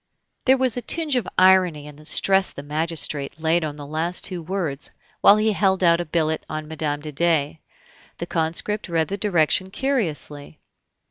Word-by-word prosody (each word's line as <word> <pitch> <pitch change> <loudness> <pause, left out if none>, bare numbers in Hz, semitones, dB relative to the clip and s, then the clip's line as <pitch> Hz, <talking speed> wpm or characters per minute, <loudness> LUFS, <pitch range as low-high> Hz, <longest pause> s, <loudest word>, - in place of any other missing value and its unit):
There 265 +1 +5
was 255 -3 +1
a - - -2
tinge 305 +3 -2
of 245 -6 0
irony 185 -5 +4
in 150 -1 -11
the 155 +1 -16
stress 190 +4 +3
the 140 - -9
magistrate 150 -1 -2
laid 165 +1 +1
on 150 -2 -4
the 145 - -9
two 145 - -12
last 170 +5 -2
words 170 -5 -3 0.3
while 205 - +7
he 215 +1 +2
held 190 -2 +1
out 170 0 +4
a - - -4
billet 160 -1 -1
on 155 0 -4
Mme. 150 -2 -3
de 150 0 -7
Dey. 160 -1 0 0.6
The 170 - -4
conscript 170 +5 -2
read 165 -2 0
the 200 - -3
direction 185 -2 +1
curiously. 165 - -2
170 Hz, 180 wpm, -23 LUFS, 155-190 Hz, 0.6 s, while